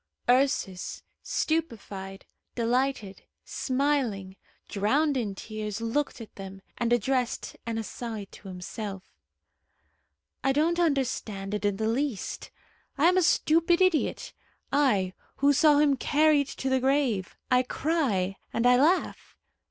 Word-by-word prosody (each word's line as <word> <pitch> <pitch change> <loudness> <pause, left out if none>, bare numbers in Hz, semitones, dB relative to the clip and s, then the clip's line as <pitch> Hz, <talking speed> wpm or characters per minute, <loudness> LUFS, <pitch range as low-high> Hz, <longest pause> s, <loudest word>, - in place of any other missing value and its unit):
Ursus, 245 -8 +1 0.2
stupefied, 205 -11 -3 0.3
delighted, 240 -3 -1 0.2
smiling, 255 -9 -1 0.3
drowned 275 +9 +1
in 215 -6 -2
tears, 215 +1 -5
looked 230 +6 -1
at 225 - -10
them, 195 0 -9 0.2
and 235 0 0
addressed 245 +1 0
an 230 -1 -2
aside 225 -2 -6
to 200 - -13
himself. 190 +1 -6 1.4
"I 270 - +3
don't 330 +4 +2
understand 250 - -1
it 210 0 -2
in 205 -1 +1
the 220 +1 -1
least. 245 -1 -2 0.5
I 315 +5 +5
am 365 - +2
a - - +5
stupid 335 +1 +3
idiot 370 -5 +1 0.4
I, 210 -11 +2 0.2
who 285 +1 +3
saw 295 +1 +5
him 290 -1 +4
carried 295 +1 +3
to 270 - -5
the 260 0 +2
grave! 260 -8 0
I 250 0 +5
cry 250 - -1
and 230 - -1
I 250 0 +6
laugh. 340 +6 0
250 Hz, 125 wpm, -27 LUFS, 205-290 Hz, 1.4 s, I